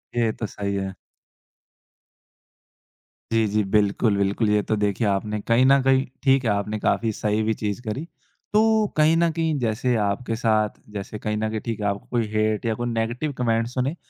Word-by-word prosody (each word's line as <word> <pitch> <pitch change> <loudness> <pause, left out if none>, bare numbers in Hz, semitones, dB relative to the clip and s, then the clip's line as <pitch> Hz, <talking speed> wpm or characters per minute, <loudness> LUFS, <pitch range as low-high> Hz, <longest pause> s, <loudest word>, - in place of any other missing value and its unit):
ये 115 -2 +2
तो 110 - -5
सही 100 0 -4
है। 95 -1 -3 2.4
जी, 115 -1 +3
जी। 105 +1 +1
बिल्कुल, 100 +1 +2
बिल्कुल, 100 +2 +1
ये 105 0 +3
तो 110 - 0
देखिए 105 +2 0
आपने 105 +2 -1
कहीं 120 +3 +4
न 135 0 +5
कहीं 135 0 +3 0.2
ठीक 135 -1 +4
है, - - +2
आपने 105 +1 -2
काफ़ी 115 +1 +1
सही 105 +1 +1
भी 110 +1 +1
चीज 105 +1 -2
करी। 130 +9 -3 0.5
तो 220 0 +4
कहीं 155 +2 +5
न 170 0 +3
कहीं 160 -2 -1
जैसे 120 +1 0
आपके 110 +3 -1
साथ 110 -2 +2 0.2
जैसे 100 +1 -6
कहीं 105 0 -2
न 110 0 -1
कहीं 110 0 -3
ठीक 115 -2 -3
है, 105 - -2
आपको 100 0 -3
कोई 115 -3 0
हेट 110 +1 0
या 110 - +1
कोई 120 - -1
नेगेटिव 120 +6 -2
कमेंट्स 115 0 0
सुने। 135 +5 -1
110 Hz, 185 wpm, -23 LUFS, 105-125 Hz, 2.4 s, न